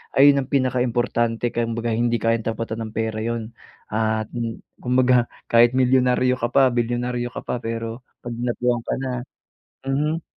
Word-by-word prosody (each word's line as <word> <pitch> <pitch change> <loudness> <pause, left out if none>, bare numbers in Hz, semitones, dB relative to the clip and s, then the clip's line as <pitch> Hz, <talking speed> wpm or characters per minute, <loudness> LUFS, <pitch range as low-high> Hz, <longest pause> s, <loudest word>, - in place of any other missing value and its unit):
Ayun 140 +1 +7
ang 130 - -7
pinaka 130 -2 +1
importante 120 -1 0
kumbaga 115 0 -1
hindi 120 +1 +1
kayang 115 -1 +1
tapatan 115 0 -4
ng 110 - -12
pera 110 -1 -1
iyon. 115 0 -3 0.4
Ah, 110 0 +1 0.6
kumbaga 125 -1 +3 0.2
kahit 120 +1 +5
milyonaryo 125 0 +3
ka 120 - +2
pa, 140 - +6
bilyonaryo 120 +1 -1
ka - - -4
pa, - - -2
pero 115 +1 -4 0.2
pag 120 - -5
dinapuan 120 0 0
ka - - -1
na 130 - -2 0.8
mhm. 150 +4 0
120 Hz, 150 wpm, -22 LUFS, 115-125 Hz, 0.8 s, Ayun